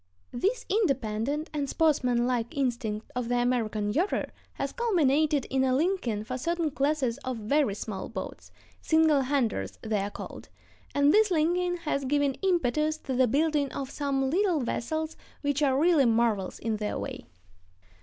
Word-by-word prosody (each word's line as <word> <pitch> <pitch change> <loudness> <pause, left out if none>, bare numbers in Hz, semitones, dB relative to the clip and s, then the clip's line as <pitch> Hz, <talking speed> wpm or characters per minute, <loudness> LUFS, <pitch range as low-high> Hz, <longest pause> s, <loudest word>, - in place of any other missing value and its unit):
This 400 - -1
independent 280 - 0
and 285 -2 -2
sportsmanlike 250 -6 +1
instinct 235 -5 -2
of 245 -2 -2
the 245 - +1
American 220 -4 0
yachter 355 +8 0 0.2
has - - -3
culminated 310 - +2
in 265 0 +2
a 260 -1 +2
liking 280 - 0
for 255 +4 -5
certain 335 +1 -1
classes 275 -4 0
of 255 -2 -4
very 225 0 +1
small 205 -2 -5
boats,—"single 315 -3 0
handers" 250 - -1
they 215 -2 0
are 200 +1 -2
called,—and 285 +6 -3
this 430 0 +5
liking 355 +2 +1
has 280 -3 -1
given 285 0 +2
impetus 310 -4 +1
to 275 -4 -5
the 255 0 +3
building 290 +2 +1
of 270 -1 -5
some 270 -2 -1
little 360 -3 +2
vessels 315 +6 -2 0.3
which 285 0 0
are 270 -3 +3
really 320 -3 +4
marvels 225 -4 +1
in 220 -1 -2
their 210 0 -3
way. - - -6
275 Hz, 145 wpm, -28 LUFS, 240-310 Hz, 0.3 s, this